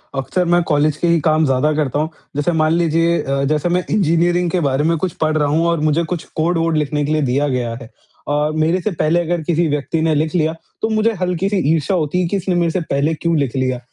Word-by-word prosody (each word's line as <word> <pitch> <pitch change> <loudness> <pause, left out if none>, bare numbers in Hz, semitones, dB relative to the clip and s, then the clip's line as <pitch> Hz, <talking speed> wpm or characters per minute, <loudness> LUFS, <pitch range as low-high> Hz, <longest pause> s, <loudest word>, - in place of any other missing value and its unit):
अक्सर 135 +7 -1
मैं 175 - +4
कॉलेज 150 -1 +1
के 175 - 0
ही 170 -1 +3
काम 155 0 +2
ज़्यादा 135 +2 +1
करता 145 -2 -1
हूँ। 155 +1 -1 0.3
जैसे 145 +4 0
मान 155 -1 +1
लीजिए 165 0 +2
अ, 140 0 -1
जैसे 150 +4 0
मैं 180 +1 +1
इंजीनियरिंग 175 -2 +2
के 185 - +1
बारे 135 +2 0
में 165 +1 +1
कुछ 180 +2 -2
पढ़ 155 0 +1
रहा 150 - +1
हूँ 165 +3 +1
और 170 -1 +1
मुझे 165 +3 +1
कुछ 170 - -5
कोड-वोड 165 0 +1
लिखने 150 0 -1
के 150 - -2
लिए 155 - +1
दिया 140 +2 +1
गया 125 -4 -2
है 115 - -11 0.4
और 150 +1 +1
मेरे 160 +4 +1
से 215 - -1
पहले 170 0 +1
अगर 170 0 -2
किसी 170 +1 +1
व्यक्ति 150 +2 -1
ने 160 -1 +1
लिख 155 +4 -1
लिया 160 -1 +1 0.3
तो 220 - 0
मुझे 220 +1 +1
हल्की-सी 180 +3 0 0.2
ईर्ष्या 165 +4 0
होती 165 +3 0
है, 175 - 0
कि 200 - -1
इसने 185 -1 -1
मेरे 170 -1 +1
से 185 - -1
पहले 145 +1 0
क्यों 165 +1 -1
लिख 140 -3 -1
लिया? 130 -1 -1
160 Hz, 245 wpm, -18 LUFS, 150-170 Hz, 0.4 s, मैं